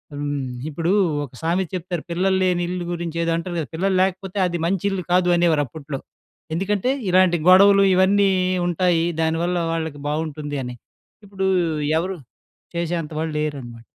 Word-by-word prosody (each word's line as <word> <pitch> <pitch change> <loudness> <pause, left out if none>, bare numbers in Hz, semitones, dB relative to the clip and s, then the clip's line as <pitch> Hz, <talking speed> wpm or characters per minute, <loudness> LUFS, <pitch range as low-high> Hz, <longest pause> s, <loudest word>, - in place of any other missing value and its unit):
హ్మ్. 145 -2 -3 0.2
ఇప్పుడూ 165 +4 -1 0.3
ఒక 135 - -17
సామెత 175 +2 0
చెప్తారు, 175 -2 -4
పిల్లల్లేని 185 0 +1
ఇల్లు 180 -1 -4
గురించి, 170 -1 -4
ఏదో 165 - +1
అంటరు 175 +1 -5
కదా! 155 - -4
పిల్లల్లేకపోతే 190 +1 0
అది 175 -1 -3
మంచిల్లు 195 +1 -1
కాదు, 180 0 +3
అనేవారు 165 -4 +3
అప్పుట్లో. 140 +1 -7 0.6
ఎందుకంటే, 205 +7 0 0.2
ఇలాంటి 180 -1 +4
గొడవలు 200 +1 +7
ఇవన్నీ 195 +1 +4 0.4
ఉంటాయి, 175 -1 +2 0.2
దానివల్ల 165 +2 0 0.2
వాళ్ళకి 160 -3 -4
బావుటుంది 150 -1 -3
అని. 125 0 -6 0.5
ఇప్పుడూ 195 -1 -2 0.5
ఎవరు 185 +2 -3 0.6
చేసే 170 0 -1
అంత 150 - -9
వాళ్ళు 160 0 -2
లేరనమాట. 125 -6 -5
175 Hz, 135 wpm, -22 LUFS, 160-185 Hz, 0.6 s, గొడవలు